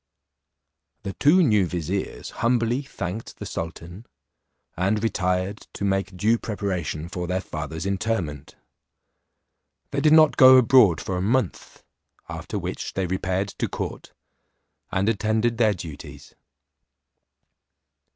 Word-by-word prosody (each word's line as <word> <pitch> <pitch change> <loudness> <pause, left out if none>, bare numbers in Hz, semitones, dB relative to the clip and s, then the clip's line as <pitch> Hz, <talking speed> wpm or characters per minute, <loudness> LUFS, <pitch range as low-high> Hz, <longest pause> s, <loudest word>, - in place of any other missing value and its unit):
The 100 - -4
two 175 +6 +4
new 105 - +3
viziers 90 +3 -4
humbly 120 +2 +1
thanked 110 -5 -6
the - - -7
sultan, 85 +6 -7 0.7
and 100 +5 0
retired 95 -1 -1
to 100 - -3
make 95 -1 -1
due 110 +5 +2
preparation 90 -7 -3
for 90 0 -5
their 90 +1 0
father's 80 -2 -6
interment. 95 -8 -3 1.4
They 140 - -1
did 155 +1 +5
not 155 -1 +6
go 130 -1 +9
abroad 115 - +5
for 95 - -3
a - - -1
month, 110 0 -1 0.4
after - - -5
which - - -5
they 95 - 0
repaired 95 +2 -1
to - - 0
court, - - -6 0.8
and 95 +2 0
attended 110 +2 0
their 110 -3 +3
duties. 80 -4 -10
100 Hz, 120 wpm, -24 LUFS, 90-115 Hz, 1.4 s, go